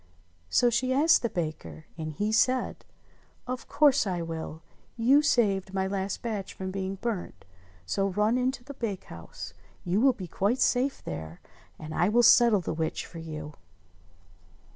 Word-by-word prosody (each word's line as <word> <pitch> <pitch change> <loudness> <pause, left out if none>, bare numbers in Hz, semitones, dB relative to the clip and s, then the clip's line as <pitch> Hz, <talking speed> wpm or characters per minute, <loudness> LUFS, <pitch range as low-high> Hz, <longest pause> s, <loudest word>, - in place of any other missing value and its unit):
So 240 - +3
she 255 +2 +1
asked 310 +5 +5
the 235 - 0
baker, 155 - -5
and 160 -1 -5
he 210 +7 -1
said, 255 +3 +1 0.6
"Of 255 0 -5
course 285 -6 +4
I 175 -3 -2
will. 160 -1 -6 0.3
You 260 +6 +5
saved 195 -9 +1
my 190 0 +1
last 195 0 -3
batch 215 -5 -4
from 190 0 -5
being 190 0 -3
burnt; 210 -2 -5 0.4
so 195 - 0
run 210 +4 +1
in 255 +1 +2
to 245 - -10
the 285 +3 -9
bakehouse, 190 - -6 0.3
you 185 +4 +1
will 270 0 +5
be 190 - -7
quite 205 +9 0
safe 265 +2 +1
there, 80 +1 -6 0.4
and 155 0 -8
I 175 +5 +2
will 240 +3 +4
settle 235 -3 +6
the 165 - -3
witch 160 0 -2
for 165 - -10
you." 155 -2 -7
195 Hz, 165 wpm, -28 LUFS, 165-240 Hz, 0.6 s, settle